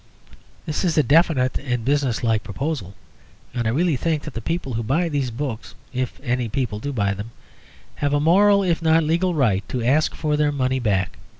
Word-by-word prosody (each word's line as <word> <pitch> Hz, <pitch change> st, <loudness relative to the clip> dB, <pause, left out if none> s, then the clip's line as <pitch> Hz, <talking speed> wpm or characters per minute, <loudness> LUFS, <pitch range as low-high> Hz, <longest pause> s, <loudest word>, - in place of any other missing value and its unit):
This 155 Hz, -, -2 dB
is 170 Hz, -4 st, 0 dB
a 150 Hz, -, +5 dB
definite 145 Hz, -4 st, +3 dB
and 125 Hz, -4 st, -3 dB
business 135 Hz, -4 st, +1 dB
like 110 Hz, -2 st, +2 dB
proposal, 100 Hz, -, -4 dB, 0.6 s
and 120 Hz, -2 st, -1 dB
I -, -, +2 dB
really 160 Hz, +6 st, +1 dB
think 155 Hz, +1 st, -1 dB
that 150 Hz, -, -7 dB
the 115 Hz, -, -5 dB
people 165 Hz, -1 st, -3 dB
who 115 Hz, -, -1 dB
buy 155 Hz, +10 st, 0 dB
these 140 Hz, -4 st, -1 dB
books 115 Hz, -5 st, -5 dB, 0.2 s
(if 130 Hz, -1 st, -3 dB
any 125 Hz, -3 st, -1 dB
people 115 Hz, -3 st, -2 dB
do 140 Hz, +6 st, -4 dB
buy 100 Hz, -6 st, 0 dB
them) 100 Hz, +3 st, -7 dB, 0.7 s
have 145 Hz, 0 st, 0 dB
a -, -, +2 dB
moral, 200 Hz, +6 st, +4 dB
if 170 Hz, -3 st, 0 dB
not 160 Hz, 0 st, +4 dB
a -, -, -2 dB
legal, 170 Hz, +3 st, +1 dB
right 110 Hz, -9 st, +2 dB
to 125 Hz, -2 st, -2 dB
ask 145 Hz, +6 st, +2 dB
for 150 Hz, -1 st, 0 dB
their 150 Hz, 0 st, +2 dB
money 130 Hz, -2 st, 0 dB
back. 95 Hz, -6 st, -1 dB
135 Hz, 205 wpm, -22 LUFS, 115-160 Hz, 0.7 s, a